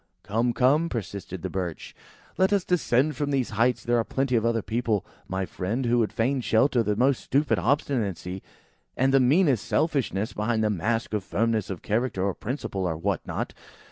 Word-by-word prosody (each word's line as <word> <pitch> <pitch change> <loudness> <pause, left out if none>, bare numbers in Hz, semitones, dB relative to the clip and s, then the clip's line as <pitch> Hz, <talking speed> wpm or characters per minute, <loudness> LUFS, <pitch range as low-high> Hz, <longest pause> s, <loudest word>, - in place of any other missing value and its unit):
"Come, 115 +5 +1
come!" 145 +7 +3
persisted 95 -4 -5
the 95 - -2
Birch; 90 -4 -4 0.4
"let 190 +1 +2
us 200 -3 +2
descend 150 -4 +2
from 145 +1 -2
these 135 -3 0
heights. 115 +4 +1
There 120 0 +2
are - - +2
plenty 135 +1 -1
of 115 - +2
other 115 -2 +1
people 110 -2 -1 0.2
my 95 0 -2
friend, 110 +9 -3
who 120 0 +3
would 110 - +1
fain 130 +4 0
shelter 120 +2 +3
the 105 -2 0
most 130 +4 +2
stupid 145 +3 +1
obstinacy, 105 - -1 0.6
and 135 +1 +2
the 135 - +6
meanest 135 - +3
selfishness, 130 - 0
behind 110 +1 0
the 105 - +2
mask 110 +5 -1
of 105 -3 -1
firmness 110 +2 0
of 95 -4 -6
character 110 -2 0
or 100 -1 +1
principle, 100 -6 -3
or 80 -2 -2
what 95 +2 -1
not. - - -3
115 Hz, 185 wpm, -26 LUFS, 100-135 Hz, 0.6 s, the